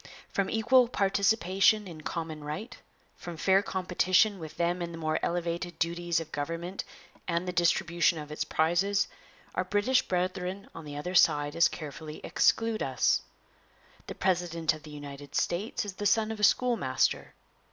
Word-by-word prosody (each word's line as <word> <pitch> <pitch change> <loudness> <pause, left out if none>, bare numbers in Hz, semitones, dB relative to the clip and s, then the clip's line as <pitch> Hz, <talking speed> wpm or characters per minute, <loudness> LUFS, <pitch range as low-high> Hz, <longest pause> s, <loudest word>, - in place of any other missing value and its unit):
From 195 -1 -1
equal 240 +3 +4
participation 200 -1 +2
in 160 -3 -9
common 160 -1 -5
right, 195 +12 -5 0.4
from 175 -2 -8
fair 190 +4 +4
competition 185 +2 +2
with 160 -2 -9
them 175 +1 0
in 170 0 -3
the - - -7
more 155 -1 -1
elevated 175 0 -2
duties 170 0 0
of 160 -1 -8
government 165 +6 -4 0.4
and 170 +1 -1
the 180 - -2
distribution 170 -1 +2
of 150 -1 -7
its 150 - -2
prizes, 175 +5 +1 0.5
our - - 0
British 220 +5 +2
brethren 185 +1 -2
on 165 - -9
the 145 -1 -7
other 180 +5 -4
side 145 -4 +4
as 170 - +5
carefully 155 0 -8
exclude 225 -1 +2
us. 130 -3 +2 0.9
The - - -6
president 170 -4 0
of 155 - -10
the 150 - -12
United 145 -1 -9
States 200 +5 -1
is 200 - -5
the 205 +2 -1
son 220 +1 +2
of 220 - -6
a - - -4
schoolmaster. 245 +2 +2
175 Hz, 160 wpm, -29 LUFS, 160-195 Hz, 0.9 s, as